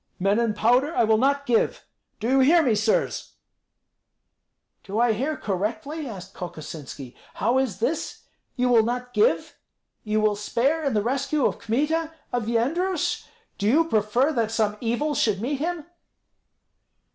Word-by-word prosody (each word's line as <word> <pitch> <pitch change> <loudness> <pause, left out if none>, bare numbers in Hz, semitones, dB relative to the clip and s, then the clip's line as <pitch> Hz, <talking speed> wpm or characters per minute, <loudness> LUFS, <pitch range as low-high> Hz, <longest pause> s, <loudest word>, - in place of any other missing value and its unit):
"Men 200 +4 +2
and 230 -3 0
powder 250 +9 +2
I - - +4
will 220 0 +3
not 280 +2 +2
give. 235 -3 +1 0.3
Do 225 - -2
you 265 +2 +3
hear 320 +6 +5
me, 250 -6 +3
sirs!" 215 +1 0 1.5
"Do 205 +2 -3
I 235 -1 +4
hear 275 +8 -2
correctly?" 220 - -3
asked 190 -3 -9
Kokosinski. 150 -6 -8 0.2
"How 240 +5 +2
is 250 -9 -1
this? 295 +8 -2 0.3
You 250 -1 +1
will 235 -2 +6
not 245 +2 -3
give? 455 +4 +1 0.4
You 215 0 0
will 215 -1 +2
spare 260 +9 0
in 275 -6 0
the 210 - +2
rescue 275 +3 0
of - - 0
Kmita, 310 +8 0 0.2
of 240 -3 -1
Yendrus? 305 +10 0 0.3
Do 200 - 0
you 315 +8 +4
prefer 235 +4 +2
that 230 -4 0
some 220 -2 0
evil 245 +6 0
should 215 -7 +1
meet 265 +5 -2
him?" 330 0 -3
240 Hz, 155 wpm, -24 LUFS, 215-280 Hz, 1.5 s, will